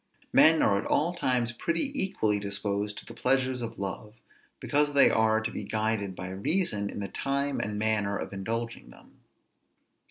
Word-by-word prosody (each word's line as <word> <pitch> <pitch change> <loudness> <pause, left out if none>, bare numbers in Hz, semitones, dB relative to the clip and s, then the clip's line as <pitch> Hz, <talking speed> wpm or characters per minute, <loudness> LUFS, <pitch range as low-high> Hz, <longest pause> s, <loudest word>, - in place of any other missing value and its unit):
Men 160 0 +6
are 100 -1 +3
at - - -5
all 170 +4 +1
times 125 -7 0
pretty 170 - -1
equally 110 - 0
disposed 100 +1 -2
to - - -8
the - - -10
pleasures 130 -1 0
of 115 -1 -6
love, 100 +2 -5 0.4
because 145 0 +1
they 140 - +6
are 110 0 +3
to 110 +1 -3
be - - -5
guided 110 -3 -1
by 90 0 -6
reason 100 - 0
in - - -6
the 100 - -3
time 140 +6 -2
and 105 0 -3
manner 105 -2 +1
of - - -6
indulging 115 +4 -4
them. - - -17
110 Hz, 170 wpm, -28 LUFS, 100-135 Hz, 0.4 s, Men